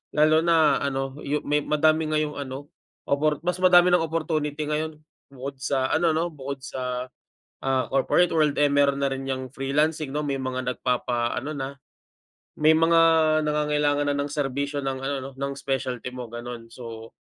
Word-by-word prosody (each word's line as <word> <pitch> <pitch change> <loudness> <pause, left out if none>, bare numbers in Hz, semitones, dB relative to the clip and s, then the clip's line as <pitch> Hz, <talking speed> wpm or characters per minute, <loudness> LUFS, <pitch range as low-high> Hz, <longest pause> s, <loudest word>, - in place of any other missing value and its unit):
Lalo 155 +1 +5
na 160 -4 +4
ano, 135 0 -3
yu 150 +1 -1
may 145 +1 +1
madami 155 +1 +2
ngayong 155 -1 -1
ano, 140 +1 -7 0.4
opor 150 +1 +1
mas 180 +1 -1
madami 180 -1 +6
ng 175 -2 +3
opportunity 155 -2 -2
ngayon. 155 +1 -1 0.4
Bukod 135 +1 -7
sa 130 0 -1
ano 160 0 +2
'no, 165 +2 0
bukod 140 -3 -7
sa, 125 -1 -4 0.6
ah, 135 -1 +1
corporate 135 +6 +3
world, 155 -3 +2
eh, 145 - +4
meron 140 -1 +2
na 140 - +2
rin 135 0 -4
'yang 130 -1 -3
freelancing 145 +2 -1
'no, 150 - -1
may 140 -2 -2
mga 130 -1 -3
nagpapa 120 -1 -1
ano 145 - -4
na 135 0 -4 0.8
may 155 +1 +5
mga 165 0 +4 0.4
nangangailangan 150 -1 +1
na 145 - 0
ng 140 0 -2
serbisyo 140 0 -2
ng 135 -1 -2
ano 140 +1 -1
'no, 135 +1 -6
ng 140 +1 -3
specialty 130 -2 -3
mo, 125 -3 -7
ganun. 120 -1 -8
So, 115 -2 -9
140 Hz, 170 wpm, -25 LUFS, 135-155 Hz, 0.8 s, madami